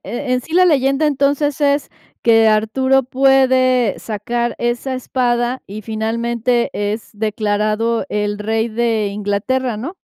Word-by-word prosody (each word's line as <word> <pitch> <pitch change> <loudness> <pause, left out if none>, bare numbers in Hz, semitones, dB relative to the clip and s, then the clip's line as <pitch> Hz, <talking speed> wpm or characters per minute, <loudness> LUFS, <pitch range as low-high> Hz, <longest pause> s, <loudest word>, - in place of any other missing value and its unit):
e 255 +2 -4
en 250 - +1
sí 320 +6 -8
la 365 +1 +6
leyenda, 275 -2 +2
entonces, 285 0 0
es 285 0 +1 0.3
que 225 -1 +5
Arturo 260 +5 +2
puede 255 -3 +2
sacar 235 +3 -3
esa 240 +2 -2
espada, 245 -1 -1
y 210 +2 -8
finalmente 235 +2 -1
es 205 +2 -3
declarado 215 +2 -1
el 205 0 -2
rey 220 +2 -1
de 225 -2 0
Inglaterra, 210 +5 -2
¿no? 275 - -6
235 Hz, 130 wpm, -18 LUFS, 215-260 Hz, 0.3 s, la